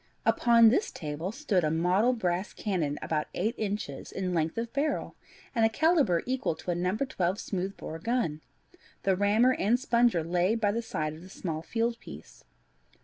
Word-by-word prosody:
Upon 230 Hz, -1 st, +6 dB
this 285 Hz, -, +1 dB
table 155 Hz, +4 st, -5 dB
stood 220 Hz, -, 0 dB
a 155 Hz, -, +2 dB
model 180 Hz, +9 st, +2 dB
brass 185 Hz, -4 st, -2 dB
cannon 165 Hz, -9 st, -2 dB
about 155 Hz, -1 st, -1 dB
eight 215 Hz, +6 st, 0 dB
inches 200 Hz, -10 st, -4 dB
in 185 Hz, -2 st, -2 dB
length 160 Hz, +1 st, 0 dB
of 230 Hz, 0 st, -3 dB
barrel, 285 Hz, +2 st, -1 dB, 0.4 s
and 230 Hz, -3 st, +2 dB
a 225 Hz, -, +5 dB
calibre 280 Hz, -, +2 dB
equal 255 Hz, -, -1 dB
to 180 Hz, -, -4 dB
a -, -, -1 dB
No. 180 Hz, +3 st, 0 dB
12 195 Hz, -8 st, -1 dB
smooth 190 Hz, 0 st, -3 dB
bore 160 Hz, -, -7 dB
gun. 230 Hz, -10 st, -1 dB, 0.6 s
The 190 Hz, -1 st, +3 dB
rammer 210 Hz, +6 st, +4 dB
and 235 Hz, +2 st, +2 dB
sponger 235 Hz, -, +2 dB
lay 175 Hz, +5 st, +1 dB
by 210 Hz, -3 st, +1 dB
the 230 Hz, +3 st, -1 dB
side 155 Hz, -9 st, -3 dB
of 155 Hz, -, -11 dB
the 185 Hz, -, -12 dB
small 165 Hz, -4 st, -4 dB
field 230 Hz, +7 st, -1 dB
piece. -, -, -12 dB
195 Hz, 180 wpm, -29 LUFS, 170-235 Hz, 0.6 s, Upon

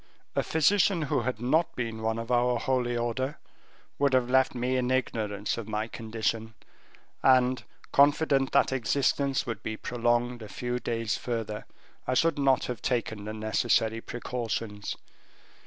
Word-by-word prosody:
A -, -, +3 dB
physician 180 Hz, +2 st, +3 dB
who 135 Hz, -3 st, 0 dB
had 125 Hz, -1 st, -2 dB
not 155 Hz, +8 st, +1 dB
been 115 Hz, -3 st, -3 dB
one 110 Hz, 0 st, 0 dB
of 115 Hz, +1 st, -5 dB
our 120 Hz, 0 st, +3 dB
holy 120 Hz, -1 st, 0 dB
order, 130 Hz, +5 st, -2 dB, 0.6 s
would 140 Hz, -1 st, +3 dB
have 125 Hz, -1 st, +2 dB
left 130 Hz, 0 st, +3 dB
me 125 Hz, +1 st, 0 dB
in 125 Hz, -1 st, 0 dB
ignorance 110 Hz, -5 st, -1 dB
of 110 Hz, -, -7 dB
my 110 Hz, 0 st, -2 dB
condition; 110 Hz, 0 st, -3 dB, 0.7 s
and, 130 Hz, -1 st, +4 dB, 0.3 s
confident 140 Hz, -1 st, +4 dB
that -, -, +3 dB
existence 135 Hz, +2 st, +1 dB
would 115 Hz, -5 st, -4 dB
be 110 Hz, 0 st, -4 dB
prolonged 120 Hz, 0 st, 0 dB
a 110 Hz, -, -8 dB
few 125 Hz, 0 st, -3 dB
days 115 Hz, -2 st, -1 dB
further, 110 Hz, -3 st, -4 dB, 0.4 s
I 130 Hz, -, +1 dB
should 165 Hz, +1 st, +2 dB
not 135 Hz, -1 st, +3 dB
have 125 Hz, -4 st, -5 dB
taken 110 Hz, -4 st, -1 dB
the 110 Hz, -, -4 dB
necessary 110 Hz, +1 st, +1 dB
precautions. 115 Hz, -4 st, -4 dB
120 Hz, 150 wpm, -28 LUFS, 110-130 Hz, 0.7 s, and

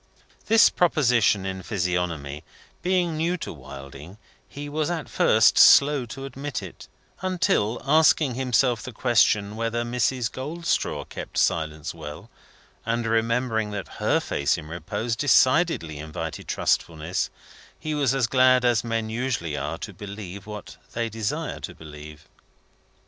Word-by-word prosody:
This 225 Hz, 0 st, +6 dB
proposition 125 Hz, -, +2 dB
in 95 Hz, 0 st, -4 dB
Physiognomy 85 Hz, -6 st, -2 dB, 0.4 s
being 180 Hz, -2 st, +1 dB
new 170 Hz, +3 st, 0 dB
to -, -, -6 dB
Wilding, 70 Hz, +5 st, -11 dB, 0.3 s
he 145 Hz, +1 st, -7 dB
was 150 Hz, +1 st, -1 dB
at 165 Hz, -6 st, -3 dB
first -, -, +4 dB
slow 140 Hz, -3 st, +6 dB
to 135 Hz, +4 st, -7 dB
admit 135 Hz, -4 st, -5 dB
it, 95 Hz, -, -10 dB, 0.3 s
until 185 Hz, -, +1 dB
asking 150 Hz, -1 st, +4 dB
himself 125 Hz, -1 st, +1 dB
the 130 Hz, -1 st, -8 dB
question 105 Hz, -3 st, +2 dB
whether 115 Hz, +1 st, -1 dB
Mrs. 120 Hz, 0 st, 0 dB
Goldstraw 160 Hz, +6 st, -2 dB
kept -, -, -8 dB
silence 80 Hz, -1 st, 0 dB
well, 80 Hz, +6 st, -9 dB, 0.5 s
and 115 Hz, +1 st, -1 dB
remembering 115 Hz, 0 st, 0 dB
that 105 Hz, -2 st, -5 dB
her -, -, +2 dB
face 70 Hz, -, 0 dB
in 80 Hz, -, -8 dB
repose 105 Hz, +8 st, -3 dB
decidedly 130 Hz, -, +3 dB
invited 80 Hz, +1 st, -6 dB
trustfulness, 80 Hz, +2 st, -1 dB, 0.5 s
he 155 Hz, -, -3 dB
was 140 Hz, -3 st, +1 dB
as 135 Hz, -3 st, +2 dB
glad 130 Hz, +1 st, +4 dB
as 120 Hz, -3 st, +3 dB
men 115 Hz, -1 st, -2 dB
usually 110 Hz, -, -2 dB
are -, -, -3 dB
to -, -, -7 dB
believe 100 Hz, -1 st, -8 dB
what 105 Hz, -2 st, -8 dB, 0.2 s
they 115 Hz, -1 st, -1 dB
desire 110 Hz, -1 st, -3 dB
to -, -, -7 dB
believe. 75 Hz, 0 st, -12 dB
115 Hz, 135 wpm, -25 LUFS, 90-135 Hz, 0.5 s, This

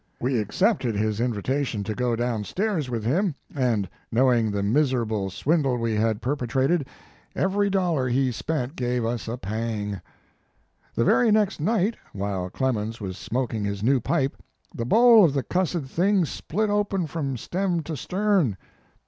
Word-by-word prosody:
We 125 Hz, -1 st, 0 dB
accepted 125 Hz, -, +1 dB
his 105 Hz, +1 st, 0 dB
invitation 125 Hz, 0 st, -1 dB
to 110 Hz, -, -3 dB
go 125 Hz, 0 st, 0 dB
down 120 Hz, -2 st, -1 dB
stairs 180 Hz, -, -1 dB
with 115 Hz, -3 st, -3 dB
him, 170 Hz, -, +1 dB, 0.2 s
and 120 Hz, -8 st, +1 dB, 0.2 s
knowing 120 Hz, -2 st, +3 dB
the 100 Hz, -1 st, -1 dB
mis 130 Hz, +6 st, +2 dB
erable 110 Hz, -5 st, -1 dB
swindle 140 Hz, -, +1 dB
we 115 Hz, -1 st, -1 dB
had 110 Hz, +1 st, 0 dB
perpetrated, 135 Hz, +3 st, 0 dB, 0.5 s
every 200 Hz, +1 st, +1 dB
dollar 175 Hz, -9 st, +1 dB
he 130 Hz, +1 st, +2 dB
spent 135 Hz, +2 st, -3 dB
gave 125 Hz, -1 st, -1 dB
us 115 Hz, -1 st, -3 dB
a 115 Hz, +2 st, -3 dB
pang. 110 Hz, -1 st, -3 dB
4 100 Hz, -, -6 dB, 0.9 s
The 115 Hz, -, +2 dB
very 240 Hz, -, +4 dB
next 210 Hz, -3 st, +2 dB
night, 210 Hz, +5 st, +1 dB, 0.2 s
while 95 Hz, -2 st, -3 dB
Clemens 115 Hz, -1 st, -2 dB
was 95 Hz, -3 st, -5 dB
smoking 115 Hz, 0 st, -2 dB
his 100 Hz, 0 st, -3 dB
new 130 Hz, +3 st, +3 dB
pipe, 135 Hz, +2 st, -1 dB, 0.3 s
the 115 Hz, -, -3 dB
bowl 230 Hz, -, +7 dB
of 160 Hz, -6 st, +4 dB
the 135 Hz, -, 0 dB
cussed 180 Hz, -2 st, 0 dB
thing 180 Hz, +7 st, +2 dB
split 205 Hz, +7 st, -2 dB
open 205 Hz, -3 st, 0 dB
from 145 Hz, -4 st, -3 dB
stem 175 Hz, -, -1 dB
to 155 Hz, +1 st, -5 dB
stern. 185 Hz, -, +1 dB
130 Hz, 160 wpm, -25 LUFS, 110-175 Hz, 0.9 s, bowl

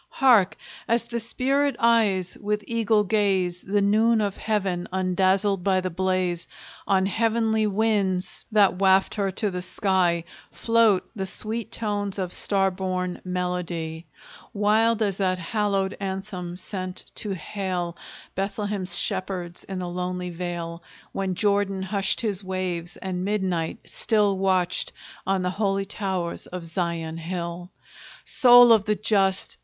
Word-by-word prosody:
Hark! 230 Hz, -9 st, +4 dB, 0.3 s
as 230 Hz, +1 st, +2 dB
the 235 Hz, 0 st, -4 dB
spirit 270 Hz, +5 st, 0 dB
eyes, 210 Hz, -6 st, +2 dB
with 210 Hz, 0 st, -1 dB
eagle 225 Hz, -2 st, +2 dB
gaze, 190 Hz, -4 st, +1 dB
The 200 Hz, +1 st, 0 dB
noon 220 Hz, +3 st, +3 dB
of 205 Hz, -2 st, -1 dB
Heaven 190 Hz, -5 st, -1 dB
undazzled 190 Hz, +1 st, +1 dB
by 190 Hz, -1 st, +3 dB
the 185 Hz, 0 st, -3 dB
blaze, 185 Hz, -1 st, -1 dB, 0.4 s
On 190 Hz, -1 st, +3 dB
heavenly 220 Hz, +1 st, +1 dB
winds 200 Hz, -3 st, +1 dB
that 200 Hz, -4 st, +4 dB
waft 190 Hz, 0 st, +4 dB
her 200 Hz, -2 st, 0 dB
to 205 Hz, +1 st, -1 dB
the 180 Hz, 0 st, -4 dB
sky 180 Hz, -3 st, +1 dB, 0.3 s
Float 230 Hz, -4 st, +2 dB
the 190 Hz, -2 st, -3 dB
sweet 225 Hz, +3 st, -4 dB
tones 205 Hz, -3 st, -2 dB
of 185 Hz, -2 st, -3 dB
star 195 Hz, -1 st, +1 dB
born 185 Hz, -1 st, -3 dB
melody; 180 Hz, -3 st, -3 dB, 0.5 s
Wild 220 Hz, +2 st, +3 dB
as 200 Hz, -2 st, -1 dB
that 185 Hz, -2 st, +1 dB
hallowed 195 Hz, +1 st, -1 dB
anthem 190 Hz, -2 st, -5 dB
sent 185 Hz, -1 st, -6 dB
to 205 Hz, -3 st, -4 dB
hail 180 Hz, 0 st, -3 dB, 0.4 s
Bethlehem's 195 Hz, -2 st, -1 dB
shepherds 185 Hz, -3 st, -2 dB
in 190 Hz, -, -5 dB
the 180 Hz, -1 st, -3 dB
lonely 180 Hz, 0 st, -3 dB
vale, 170 Hz, -1 st, -5 dB, 0.3 s
When 190 Hz, -2 st, -2 dB
Jordan 200 Hz, -1 st, +1 dB
hushed 190 Hz, -1 st, 0 dB
his 205 Hz, -4 st, +1 dB
waves, 185 Hz, -2 st, -3 dB
and 185 Hz, -1 st, -4 dB
midnight 190 Hz, -5 st, -1 dB
still 210 Hz, -3 st, +1 dB
Watched 185 Hz, -2 st, 0 dB, 0.3 s
on 190 Hz, -1 st, +1 dB
the 180 Hz, -, 0 dB
holy 195 Hz, 0 st, 0 dB
towers 190 Hz, -4 st, -3 dB
of 180 Hz, -2 st, -7 dB
Zion 165 Hz, -1 st, -3 dB
hill. 170 Hz, +1 st, -5 dB, 0.6 s
Soul 245 Hz, -1 st, +7 dB
of 215 Hz, -3 st, +5 dB
the 210 Hz, 0 st, +1 dB
just! 195 Hz, -2 st, +1 dB
190 Hz, 135 wpm, -25 LUFS, 180-210 Hz, 0.6 s, Soul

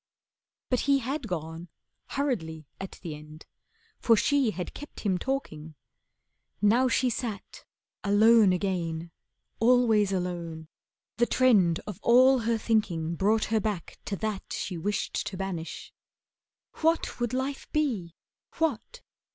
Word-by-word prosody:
But 250 Hz, -, +3 dB
he 280 Hz, -, +6 dB
had 270 Hz, 0 st, -3 dB
gone, 165 Hz, -1 st, -5 dB, 0.5 s
hurriedly 165 Hz, -, -2 dB
at 195 Hz, -, -6 dB
the 165 Hz, -4 st, -4 dB
end, 150 Hz, +1 st, -12 dB, 0.5 s
For 230 Hz, -, +5 dB
she 280 Hz, 0 st, +3 dB
had 180 Hz, -3 st, -5 dB
kept 295 Hz, -, -10 dB
him 190 Hz, -4 st, 0 dB
talking. 160 Hz, -, -4 dB, 0.8 s
Now 225 Hz, +6 st, +4 dB
she 255 Hz, 0 st, +2 dB
sat 220 Hz, -3 st, -5 dB, 0.4 s
Alone 210 Hz, 0 st, +6 dB
again, 170 Hz, -3 st, -2 dB, 0.5 s
always 225 Hz, -4 st, +4 dB
alone, 170 Hz, -4 st, -4 dB, 0.5 s
the 240 Hz, 0 st, +3 dB
trend 200 Hz, -10 st, +3 dB
Of 210 Hz, -4 st, -7 dB
all 255 Hz, +2 st, +6 dB
her 230 Hz, 0 st, 0 dB
thinking 180 Hz, -8 st, 0 dB
brought 210 Hz, +6 st, +2 dB
her 220 Hz, -, +4 dB
back 210 Hz, -5 st, -4 dB
to 200 Hz, -, -2 dB
that 215 Hz, -1 st, -4 dB
She 185 Hz, -, -3 dB
wished 205 Hz, +5 st, -2 dB
to 190 Hz, -, -5 dB
banish. 180 Hz, -4 st, -5 dB, 0.9 s
What 325 Hz, -3 st, +1 dB
would 240 Hz, -1 st, -1 dB
life 265 Hz, +2 st, -3 dB
be? 225 Hz, -, -1 dB, 0.4 s
What? 325 Hz, -, -2 dB
210 Hz, 125 wpm, -28 LUFS, 175-245 Hz, 0.9 s, he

